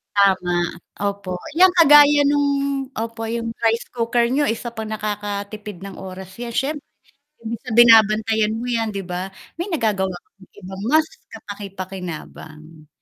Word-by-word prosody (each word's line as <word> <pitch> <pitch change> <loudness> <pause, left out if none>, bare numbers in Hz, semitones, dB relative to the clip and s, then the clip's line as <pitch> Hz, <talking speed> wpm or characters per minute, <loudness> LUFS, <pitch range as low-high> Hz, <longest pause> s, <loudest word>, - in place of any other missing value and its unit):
Tama, 190 -3 +3 0.6
opo, 195 -3 -4 0.2
'yan 370 +2 +7
kagaya 295 -4 +7
nung 285 0 +2 0.5
opo 225 0 -4
yung 230 -1 -3
rice 230 +1 +1
cooker 235 0 +1
niyo 275 +4 +1
isa 230 -2 -2
pang 220 -1 -5
nakakatipid 205 -2 -5
ng 195 -1 -9
oras 190 0 -9
'yan 235 0 -6
siyempre, 280 +4 -2 0.6
imbes 230 +1 -4
na - - -5
binabantayan 220 -1 +5
mo 240 - -5
'yan, 230 -2 -1
'di 200 -2 -5
ba? 180 +2 -4 0.3
May 375 - -4
nagagawa 215 - 0 0.2
kang 195 -1 -21
ibang 190 +1 -8
mas 310 +2 +4 0.2
kapaki-pakinabang. 180 -6 -9
215 Hz, 140 wpm, -21 LUFS, 190-235 Hz, 0.6 s, yan